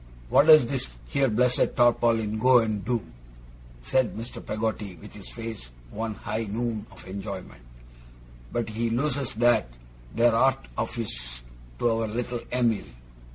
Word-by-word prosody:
'What 145 - +5
does 155 -5 +9
this 130 +1 -2 0.2
here 140 -1 +2
blessed 125 +3 +2
tarpaulin 115 -3 +3
go 125 +2 +6
and 110 -4 +1
do,' 120 -1 -1 0.8
said 130 - +1
Mr. 115 +2 -7
Peggotty, 105 -3 -3
with 80 - -13
his 105 -2 -10
face 115 - -7 0.2
one 110 0 -3
high 110 +2 -3
noon 110 0 -3
of - - -14
enjoyment, 95 -9 -7 0.9
'but 115 -2 -2
he 115 +2 -1
loses 135 +1 -1
that 120 - +3 0.5
there 115 +1 +4
art 115 - +2
of - - -2
his - - -5 0.4
to 120 - +2
our 115 0 0
little 120 +2 -3
Em'ly. 120 -4 +1
115 Hz, 145 wpm, -26 LUFS, 105-120 Hz, 0.9 s, does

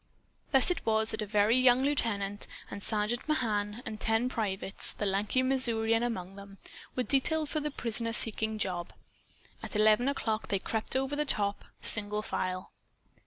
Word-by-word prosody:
Thus 270 +5 +7
it 360 - -3
was 220 0 0
that 220 - -4
a 215 - -4
very 210 +2 +2
young 255 0 +4
lieutenant 205 -8 -1 0.2
and 200 - -7
Sergeant 215 +5 -2
Mahan 215 -5 -1
and 215 -1 -7
ten 225 +3 0
privates 200 -5 +2
the 210 - -4
lanky 205 +6 0
Missourian 230 -4 +2
among 195 -6 -4
them 200 0 -12 0.4
were 255 - -1
detailed 300 +4 0
for 310 - -2
the 300 0 -3
prisoner 230 -4 0
seeking 220 -1 +2
job. 180 -5 -3 0.7
At - - -8
eleven 215 +3 +3
o'clock, 225 -6 -2
they 200 - 0
crept 220 +5 -4
over 270 +2 -1
the 300 - 0
top, 205 -8 +1 0.2
single 210 0 +3
file. 185 -2 -4
220 Hz, 165 wpm, -29 LUFS, 205-255 Hz, 0.7 s, Thus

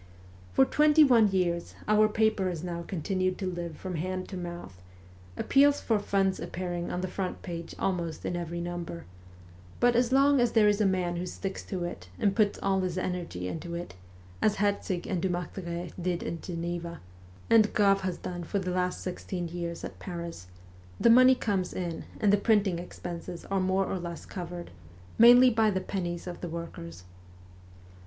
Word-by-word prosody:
For 135 - +5
twenty 300 - +5
one 240 -6 +6
years 175 -3 -1
our 215 0 +5
paper 215 -3 +1
has 170 -2 -5
now 170 -1 -4
continued 185 +2 -1
to 195 - -4
live 175 -3 -4
from 185 -3 -5
hand 185 +3 -3
to 195 - -6
mouth, 175 - -7 0.6
appeals 285 +1 +4
for 220 -3 +1
funds 195 -2 +1
appearing 175 -1 -4
on 180 - -2
the 185 - -2
front 185 0 -4
page 170 -2 -6
almost 170 -4 -2
in 175 - -1
every 170 0 -4
number; 175 -1 -5 0.7
but 245 0 +4
as 245 +1 +2
long 275 +1 +5
as 240 -1 +2
there 220 -2 +5
is 205 0 +3
a 205 - +4
man 180 -2 0
who 180 +1 -3
sticks 195 +2 -5
to 185 -3 -3
it 95 - -6
and 200 -1 +1
puts 210 -3 +2
all 195 -1 +2
his 185 -1 -2
energy 175 - -3
into 170 - -5
it, 170 - -6 0.5
as 215 - +3
Herzig 200 -3 -1
and 185 -4 -2
Dumartheray 175 -1 -3
did 175 -1 -1
at 165 - -4
Geneva, 170 -1 -4 0.5
and 220 -2 +5
Grave 200 -2 +4
has 185 -2 -2
done 175 -1 -5
for 170 - -2
the 185 -2 -2
last 180 0 -1
sixteen 180 -1 -4
years 170 0 -5
at - - -7
Paris, 170 - -6 0.5
the 235 - +6
money 255 +2 +7
comes 195 -7 -1
in 170 -3 -4
and 205 -1 +3
the - - +6
printing 200 -4 +2
expenses 175 -1 -7
are 195 - +2
more 190 +1 +1
or 190 - -3
less 170 -1 -6
covered, 175 -1 -7 0.5
mainly 245 +2 +9
by 220 -1 +3
the 190 -2 0
pennies 175 -2 -4
of 180 -1 -7
the 175 - -4
workers. 90 - -7
180 Hz, 180 wpm, -29 LUFS, 170-205 Hz, 0.7 s, mainly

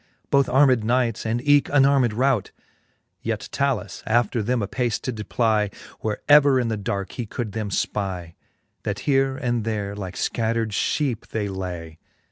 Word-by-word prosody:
Both 140 -2 +4
armed 130 -3 +4
knights, 115 -1 0
and 120 +5 -2
eke 145 -1 +5
unarmed 135 -4 +4
rout: 125 -1 +1 0.7
Yet 110 -2 -3
Talus 135 -7 -1
after 115 0 +2
them 120 +1 0
apace 120 +2 -1
did 125 -3 -4
plie, 110 -4 +2 0.3
Where 110 -2 -3
ever 145 -2 +6
in 120 -2 0
the 110 - 0
darke 100 -1 -3
he 120 -3 -5
could 115 0 -4
them 110 0 -3
Ipie; 95 -4 -2 0.5
That 100 0 -3
here 135 0 +2
and 120 -4 -1
there 105 -2 -3
like 95 -3 -6
fcattred 115 -1 -1
Iheepe 120 +3 -1
they 105 -2 -2
lay. 90 -4 -6
115 Hz, 155 wpm, -23 LUFS, 105-130 Hz, 0.7 s, ever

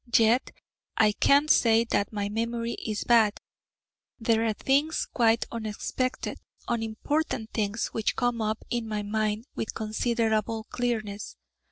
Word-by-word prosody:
Yet 230 +3 +3 0.5
I 210 - +5
can't 285 +8 +4
say 225 -1 +5
that 205 -3 0
my 205 -2 -2
memory 230 +2 -2
is 215 -3 -3
bad: 225 -4 +4 0.8
there 225 -1 +2
are 220 - +1
things 285 +8 +1
quite 230 -1 +3
unexpected, 230 +3 -3 0.3
unimportant 225 +2 -2
things 215 +1 -1
which 220 - -1
come 245 -2 0
up 215 0 -2
in 235 -2 -1
my 210 -1 -2
mind 215 +1 -1
with 220 - -4
considerable 220 0 0
clearness. 220 -4 -3
225 Hz, 130 wpm, -27 LUFS, 215-235 Hz, 0.8 s, I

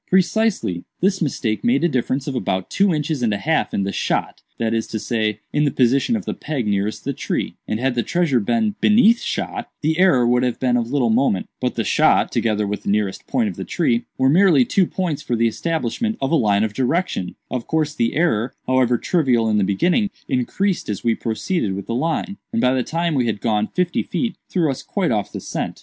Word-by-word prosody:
"Precisely. 190 - +1 0.2
This 190 +1 +1
mistake 115 -8 -1
made 240 -3 +2
a - - +5
difference 130 -1 -1
of 140 - -3
about 95 -7 -2
two 195 -1 +3
inches 150 -3 -1
and 115 -3 +1
a - - -2
half 160 +8 0
in 100 - -1
the 100 - -2
'shot'—that 115 +2 -2
is 115 -1 -1
to 110 - -4
say, 110 -1 -1
in 150 - +2
the 145 - +3
position 135 - +2
of 210 - -4
the - - -2
peg 145 -6 -3
nearest 100 +1 -1
the - - -1
tree; - - -3
and 110 - -2
had 130 +1 +1
the 120 - 0
treasure 165 -4 +1
been 215 - 0
beneath 230 +2 +5
the - - -8
'shot,' - - -3
the 160 +3 0
error 145 -10 +5
would 125 +1 +3
have 125 -2 -1
been 125 -2 +2
of 120 -1 0
little 130 -5 +2
moment; 115 -5 +1
but - - -1
'the - - 0
shot,' - - +3
together 105 -2 0
with 105 +1 -3
the - - -4
nearest 100 -1 -1
point 235 -3 +1
of 205 - -5
the - - -4
tree, 120 -9 0
were 130 - +3
merely 160 -3 +5
two 185 +5 +2
points 175 -6 -2
for 120 - -2
the 115 0 +2
establishment 165 - -2
of 135 0 -1
a - - +4
line 105 -6 +3
of 110 -1 -2
direction; 135 - -1 0.2
of 125 -2 -3
course 155 -2 0
the 115 -6 0
error, 130 -7 +1
however 130 -2 +2
trivial 125 -8 +1
in 105 -1 +2
the - - +2
beginning, 175 - +1 0.2
increased 170 - -1
as 105 - -3
we 115 - +3
proceeded 110 - -2
with 100 - -6
the - - -4
line, 165 - -1
and 230 - -1
by 125 - +3
the 130 - +1
time 165 +5 -1
we 125 -4 +1
had 105 -2 -1
gone 110 -2 0
fifty 180 -1 0
feet, 235 -3 -2
threw 165 -6 +1
us 135 0 -5
quite 185 +1 -1
off 105 -3 -1
the - - -5
scent. - - -4
130 Hz, 230 wpm, -21 LUFS, 115-175 Hz, 0.2 s, a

